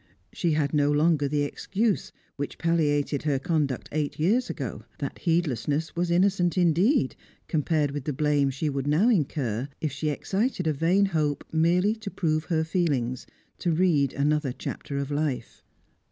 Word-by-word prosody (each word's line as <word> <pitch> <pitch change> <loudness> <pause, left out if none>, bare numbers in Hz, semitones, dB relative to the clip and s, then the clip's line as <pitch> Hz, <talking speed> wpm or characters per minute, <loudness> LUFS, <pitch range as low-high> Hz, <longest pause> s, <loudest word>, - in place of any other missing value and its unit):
She 170 -2 0
had 150 -1 0
no 145 -1 +3
longer 150 -1 +3
the 145 +1 0
excuse 200 +8 -1 0.2
which 145 0 -5
palliated 150 -4 +1
her 145 -3 +1
conduct 145 -4 -1
eight 150 -1 -2
years 225 +10 +2
ago; - - -5
that - - -5
heedlessness 155 - 0
was 175 +1 0
innocent 180 0 +2
indeed 175 - +3 0.3
compared 150 -2 +1
with 140 -1 -5
the 150 - -1
blame 145 0 +2
she 135 +4 -2
would 140 -1 -2
now 165 +11 +4
incur, 140 - 0
if 155 -3 -2
she 145 +3 -2
excited 195 - -1
a 155 - +2
vain 175 +7 +3
hope 155 -6 0
merely 175 +6 +3
to 220 -2 -6
prove 155 -5 -1
her 160 -3 +1
feelings, 145 -8 -1 0.3
to 175 - 0
read 155 -5 +2
another 150 -1 +1
chapter 140 +2 -5
of 140 +1 -3
life. 145 -3 -2
155 Hz, 160 wpm, -26 LUFS, 145-175 Hz, 0.3 s, now